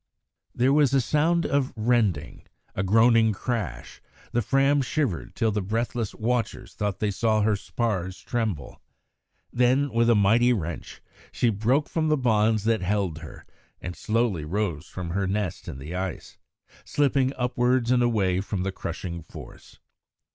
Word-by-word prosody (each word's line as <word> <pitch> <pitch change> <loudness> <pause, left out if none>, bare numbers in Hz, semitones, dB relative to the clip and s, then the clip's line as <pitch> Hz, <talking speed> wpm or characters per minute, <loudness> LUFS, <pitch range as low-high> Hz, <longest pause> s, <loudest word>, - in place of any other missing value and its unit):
There 130 +3 +3
was 145 -3 +4
a - - +5
sound 160 +6 +1
of 140 -2 0
rending; 110 -9 0 0.3
a - - -2
groaning 110 +3 +4
crash; 100 - -4 0.3
the 120 - +1
Fram 135 +5 +2
shivered 115 - -2
till 110 -1 +1
the 105 0 -1
breathless 115 +2 -2
watchers 120 +1 -2
thought 105 -2 -2
they 105 -1 -1
saw 110 +1 +1
her 105 0 +2
spars 95 -4 -3
tremble. 110 -11 -3 0.7
Then, 125 +3 +2
with 115 0 +3
a 115 - +5
mighty 115 +5 +4
wrench, 85 -6 -5 0.3
she 120 - +1
broke 120 +8 +1
from 160 -1 -1
the 155 0 +3
bonds 110 -4 +2
that 115 -1 +1
held 95 -4 -1
her, 80 -2 -11 0.3
and 90 +1 -6
slowly 110 -7 0
rose 85 -2 -2
from 90 -2 -6
her 100 +2 -1
nest 100 -2 -3
in - - -6
the 70 +6 -8
ice, 95 -1 -5 0.4
slipping 135 -2 +1
upwards 125 0 +1
and 125 -1 +4
away 100 -6 +1
from 95 -2 -3
the 95 - -1
crushing 85 -1 -6
force. 80 - -13
110 Hz, 155 wpm, -25 LUFS, 95-125 Hz, 0.7 s, a